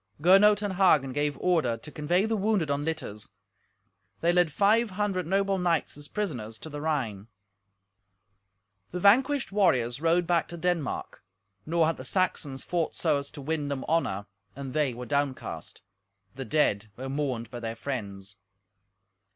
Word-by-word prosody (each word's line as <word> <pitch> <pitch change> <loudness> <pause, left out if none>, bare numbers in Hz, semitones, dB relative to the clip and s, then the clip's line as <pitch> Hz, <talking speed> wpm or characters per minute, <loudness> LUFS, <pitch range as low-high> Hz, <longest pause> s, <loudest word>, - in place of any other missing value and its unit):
Gernot 195 +5 +6
and 200 -2 -1
Hagen 155 -9 +3
gave 145 0 -1
order 160 -10 +1
to 135 +6 -11
convey 175 +7 +1
the 220 0 0
wounded 200 -7 +1
on 140 +1 0
litters. 150 -10 -4 0.9
They 170 - +3
led 175 -3 +3
five 215 +6 +3
hundred 190 -3 -2
noble 195 +1 +1
knights 170 -3 0
as 145 0 -9
prisoners 125 - -4
to 160 - -10
the 145 0 -6
Rhine. 120 -10 -2 1.6
The 180 - -4
vanquished 260 +8 +4
warriors 130 - +2
rode 170 +2 +3
back 170 -1 +1
to 170 - -8
Denmark. 170 -4 -2 0.4
Nor 165 0 +3
had 165 +1 0
the - - -8
Saxons 155 -7 -1
fought 170 -3 -1
so 155 -4 +2
as 140 0 -6
to 145 - -9
win 150 0 -2
them 140 -2 -3
honour, 130 -12 0 0.3
and 135 -1 -6
they 145 -5 +1
were 125 +1 -6
downcast. 140 - -3 0.5
The 135 - -6
dead 110 -5 +1
were 130 +2 -5
mourned 130 -5 -3
by 120 - -6
their 115 -1 -4
friends. 100 -6 -6
155 Hz, 160 wpm, -28 LUFS, 130-180 Hz, 1.6 s, Gernot